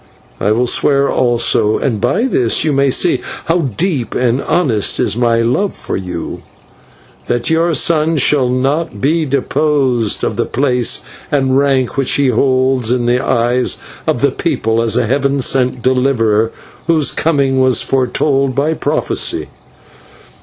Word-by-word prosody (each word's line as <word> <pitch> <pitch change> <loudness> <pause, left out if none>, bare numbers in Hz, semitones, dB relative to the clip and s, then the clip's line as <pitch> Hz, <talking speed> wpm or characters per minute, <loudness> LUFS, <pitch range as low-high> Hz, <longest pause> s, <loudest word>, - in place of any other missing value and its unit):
I 100 - 0
will 120 +3 +1
swear 140 +3 +2
also 115 -3 +1
and 115 -7 -2
by 230 - +1
this 125 - +1
you 155 -2 0
may 140 0 +2
see 175 +7 +2 0.2
how 165 +2 +1 0.2
deep 155 -9 -2
and 125 +1 0
honest 120 - 0
is - - +1
my 115 -1 +1
love 125 - 0
for - - -5
you 90 -2 -6 0.9
that 120 +4 -1
your 165 0 +1
son 160 0 +1
shall 135 -2 +2
not 135 0 -1
be 155 +6 +1
dispossessed 135 -4 0
of 110 - -2
the 120 - -1
place 125 -2 0 0.3
and 135 -2 +1
rank 135 -2 +1
which 135 -2 +2
he 140 -2 +2
holds 130 0 +1
in 125 -1 0
the 125 +2 +1
eyes 120 +1 +1 0.3
of - - 0
the - - +2
people 115 +1 -1
as 115 -1 0
a 125 - +1
Heaven 140 +3 0
sent 125 -1 0
Deliverer 115 -4 +1 0.4
whose 160 -4 +2
coming 140 -4 +1
was 130 -3 +3
foretold 135 +1 0
by 145 +4 +1
prophecy. - - -2
130 Hz, 150 wpm, -14 LUFS, 120-140 Hz, 0.9 s, was